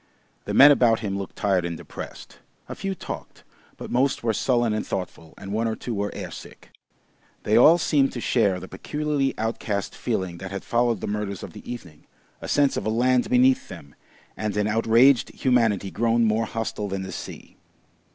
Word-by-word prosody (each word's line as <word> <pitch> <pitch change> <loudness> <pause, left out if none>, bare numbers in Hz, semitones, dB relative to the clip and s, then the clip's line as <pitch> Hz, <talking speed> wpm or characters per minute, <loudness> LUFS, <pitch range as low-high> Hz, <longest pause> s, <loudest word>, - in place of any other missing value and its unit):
The - - -3
men 145 +2 +9
about 120 -5 +3
him 100 -3 -3
looked 100 -1 -6
tired 95 -3 +1
and 85 -1 -4
depressed; - - -10 0.3
a - - -6
few 195 0 -4
talked, - - -8 0.3
but - - -8
most 130 +1 +1
were 115 -1 +1
sullen 120 0 +1
and 110 - -1
thoughtful, 90 -4 -6
and 100 0 -7
one 115 +2 0
or 110 - -2
two 120 - -5
were 100 -1 -2
air - - -6
sick. - - -12 0.7
They 105 - +1
all 155 +8 +7
seemed 145 -5 +2
to 120 - -5
share 105 -6 +1
the 95 - -9
peculiarly 145 +7 -2
outcast 110 -3 -3
feeling 90 -2 -3
that 95 - -6
had 95 0 -6
followed 120 -3 +1
the - - -4
murders 105 -2 -4
of - - -8
the - - -9
evening, 85 -11 -10 0.3
a - - -6
sense 145 -1 +2
of - - -3
a - - +2
land 125 +2 +2
beneath 125 +1 +3
them, 85 -6 -11 0.4
and 105 -1 -3
an 105 - +1
outraged 115 +4 +4
humanity 115 -7 +1
grown 115 0 +1
more 110 +1 +1
hostile 110 -2 -4
than 95 -1 -4
the 95 - -7
Sea. - - -9
110 Hz, 190 wpm, -24 LUFS, 100-125 Hz, 0.7 s, men